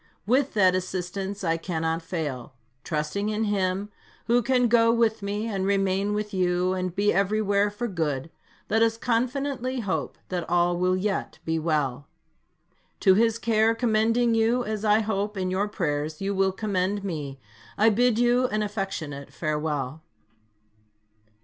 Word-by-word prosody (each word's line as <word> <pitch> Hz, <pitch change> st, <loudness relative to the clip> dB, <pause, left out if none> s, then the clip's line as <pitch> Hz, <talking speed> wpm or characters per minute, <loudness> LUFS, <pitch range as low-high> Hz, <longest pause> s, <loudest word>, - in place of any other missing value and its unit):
With 260 Hz, +5 st, +1 dB
that 190 Hz, -3 st, +5 dB
assistance, 185 Hz, +2 st, -3 dB
I 165 Hz, -1 st, +1 dB
cannot 165 Hz, -1 st, -2 dB
fail. 150 Hz, -8 st, -5 dB, 0.3 s
Trusting 155 Hz, +7 st, -2 dB
in 215 Hz, +1 st, -1 dB
Him, 200 Hz, -1 st, 0 dB, 0.4 s
who 240 Hz, +1 st, +3 dB
can 250 Hz, 0 st, +2 dB
go 230 Hz, 0 st, +4 dB
with 230 Hz, -2 st, +2 dB
me, 205 Hz, +2 st, -2 dB
and 200 Hz, -4 st, -2 dB
remain 195 Hz, +1 st, +1 dB
with 210 Hz, 0 st, -3 dB
you, 180 Hz, 0 st, +1 dB
and 185 Hz, -1 st, -3 dB
be 205 Hz, +1 st, +2 dB
everywhere 200 Hz, +1 st, +2 dB
for 210 Hz, +4 st, -4 dB
good, 160 Hz, -, -2 dB, 0.4 s
let 220 Hz, +1 st, +2 dB
us 225 Hz, 0 st, +3 dB
confidently 255 Hz, +2 st, -1 dB
hope 200 Hz, -4 st, -3 dB
that 180 Hz, -2 st, -3 dB
all 175 Hz, 0 st, +2 dB
will 180 Hz, +1 st, +1 dB
yet 195 Hz, +1 st, -2 dB
be 160 Hz, 0 st, 0 dB
well. 145 Hz, -4 st, -1 dB, 0.9 s
To 190 Hz, -, +6 dB
His 225 Hz, +3 st, +3 dB
care 225 Hz, 0 st, +2 dB
commending 230 Hz, +1 st, +2 dB
you, 225 Hz, +2 st, +2 dB
as 215 Hz, -1 st, -3 dB
I 215 Hz, 0 st, +4 dB
hope 210 Hz, -1 st, -2 dB
in 185 Hz, -1 st, -1 dB
your 195 Hz, +3 st, 0 dB
prayers 155 Hz, -6 st, -2 dB
you 195 Hz, +1 st, -1 dB
will 190 Hz, 0 st, +2 dB
commend 195 Hz, 0 st, -1 dB
me, 145 Hz, -8 st, -5 dB, 0.4 s
I 220 Hz, +2 st, +5 dB
bid 240 Hz, +1 st, +3 dB
you 245 Hz, +1 st, +3 dB
an 215 Hz, -2 st, -1 dB
affectionate 160 Hz, -9 st, -4 dB
farewell. 150 Hz, -1 st, -2 dB
200 Hz, 150 wpm, -26 LUFS, 175-220 Hz, 0.9 s, To